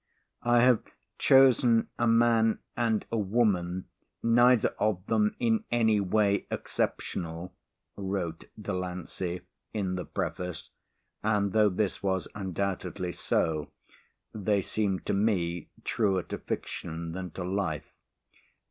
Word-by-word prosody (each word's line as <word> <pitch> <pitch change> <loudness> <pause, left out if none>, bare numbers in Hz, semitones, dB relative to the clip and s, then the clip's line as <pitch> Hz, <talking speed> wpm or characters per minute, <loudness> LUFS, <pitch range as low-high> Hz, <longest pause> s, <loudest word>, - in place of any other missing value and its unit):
"I 120 0 +4
have 125 -2 +5 0.4
chosen 125 -3 +5
a 120 - +3
man 115 -1 +4 0.2
and 115 -3 +1
a 115 - +1
woman, 95 -4 +1 0.4
neither 120 +1 +5
of 105 -3 0
them 210 - +2
in 225 -2 +1
any 110 -3 +3
way 100 +1 +2
exceptional," 85 +1 -3 0.4
wrote 95 -4 -3
Delancey 90 -2 -4 0.3
in 95 -3 -1
the 90 - -4
preface 90 -2 -4 0.5
and 105 -2 +1
though 105 -1 +5
this 100 +1 -1
was 95 -2 0
undoubtedly 95 -1 -3
so, 80 -3 0 0.6
they 105 -2 +1
seemed 100 -3 -1
to - - 0
me 90 -5 0
truer 95 -5 +1
to - - -6
fiction 85 0 -5
than 90 +1 -5
to 90 - -4
life. 90 -5 -2
100 Hz, 115 wpm, -29 LUFS, 90-115 Hz, 0.6 s, have